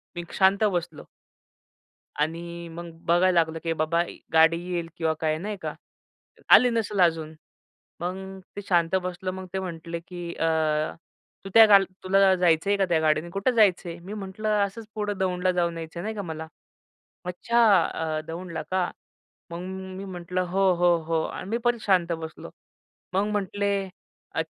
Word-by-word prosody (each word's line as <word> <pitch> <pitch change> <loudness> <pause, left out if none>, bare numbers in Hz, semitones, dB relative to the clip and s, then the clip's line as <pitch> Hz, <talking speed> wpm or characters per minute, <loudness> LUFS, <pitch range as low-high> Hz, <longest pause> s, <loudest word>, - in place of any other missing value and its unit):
मी 175 - -4 0.2
शांत 195 +2 +4
बसलो. 175 -6 -1 1.1
आणि 170 +2 -3
मग 170 0 -8
बघायला 175 +2 +3
लागलो, 160 0 0
की 165 0 0
बाबा 160 +2 +1 0.3
गाडी 160 +1 +6
येईल 170 -1 -2
किंवा 160 -1 +1
काय 155 -1 0
नाही 205 +4 -4
का? - - -4 0.8
आली 250 - +8
नसेल 220 -4 -1
अजून, 160 -2 +2 0.7
मग 190 +2 -5 0.2
ते 205 - -5
शांत 170 -1 +3
बसलो. 185 +1 -4
मग 190 0 -7
ते 190 - -1
म्हटले 170 -2 -5
की 175 0 -7
अ, 165 - 0 1.0
"तू - - -5
त्या 225 -1 +10
गाल 200 -2 +7 0.2
तुला 190 0 +4
जायचं 175 0 +2
आहे 200 - +3
का 195 - +2
त्या 165 -2 +3
गाडीने 155 +2 +1
कुठं 200 +7 +1
जायचं 195 -5 +3
आहे?" 170 - -7
मी 190 +5 -8
म्हटलं, 210 +1 -4 0.2
"असंच 215 +3 -8
पुढं 205 -2 -2
दौंडला 185 -1 +1
जाऊन 170 -1 0
यायचं 165 +1 -7
आहे - - -5
नाही 220 +1 -3
का 205 - -3
मला." 160 -3 -6 0.8
"अच्छा 205 +7 +1 0.2
अ, 160 -1 -2
दौंडला 170 +1 -5
का?" 185 -1 +1 0.6
मग 170 - -5 0.4
मी 195 - -6
म्हटलं 180 -1 -3
"हो, 190 +1 +3
हो, 175 0 +4
हो" 165 -1 +1
आणि 185 - -6
मी 230 - 0
परत 240 -1 +2
शांत 180 -4 +2
बसलो. 160 - -8 0.6
मग 195 +2 +1
म्हटले 200 0 -1 0.6
अ - - +1
180 Hz, 165 wpm, -26 LUFS, 165-195 Hz, 1.1 s, त्या